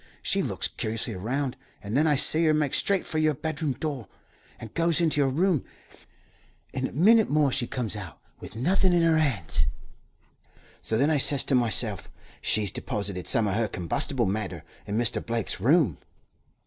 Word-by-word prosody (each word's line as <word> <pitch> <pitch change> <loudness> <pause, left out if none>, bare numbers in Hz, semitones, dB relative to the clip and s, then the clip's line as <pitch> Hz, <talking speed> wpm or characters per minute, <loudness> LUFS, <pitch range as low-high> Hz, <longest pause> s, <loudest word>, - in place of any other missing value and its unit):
She - - +1
looks - - -1
curiously 110 +1 -3
'round, 125 +8 -3 0.3
and 105 +3 -4
then 155 +3 +3
I 150 - +3
see 155 +4 +2
her 155 -1 +4
make 150 -3 0
straight 200 -2 +1
for 155 - -3
your 155 -1 +2
bedroom 155 -1 -3
door, 135 - -5 0.5
and 110 - -10
goes 170 0 +2
into 160 -3 +2
your 135 - +2
room. 165 +2 +1 1.1
In 130 0 -1
a - - -11
minnit 215 - +4
more 145 -2 +2
she 125 -3 0
comes 120 -4 -2
out, 90 -6 -8 0.2
with - - -11
nothin' 180 - +2
in 170 -1 +3
her 165 -1 +4
hands. 120 - 0 1.1
So 110 - -1
then 140 +6 +2
I 150 - +2
says 140 0 +1
to - - -1
myself, 120 -4 +1 0.3
'She's 105 -3 +1
deposited 100 -7 -4
some 115 -2 +4
o' 100 - -1
her 110 +2 0
combustible 90 -4 -1
matter 95 -4 -3 0.2
in 105 +1 -2
Mr. 120 -2 0
Blake's 115 -5 -2
room.' 130 - +3
130 Hz, 175 wpm, -26 LUFS, 110-155 Hz, 1.1 s, her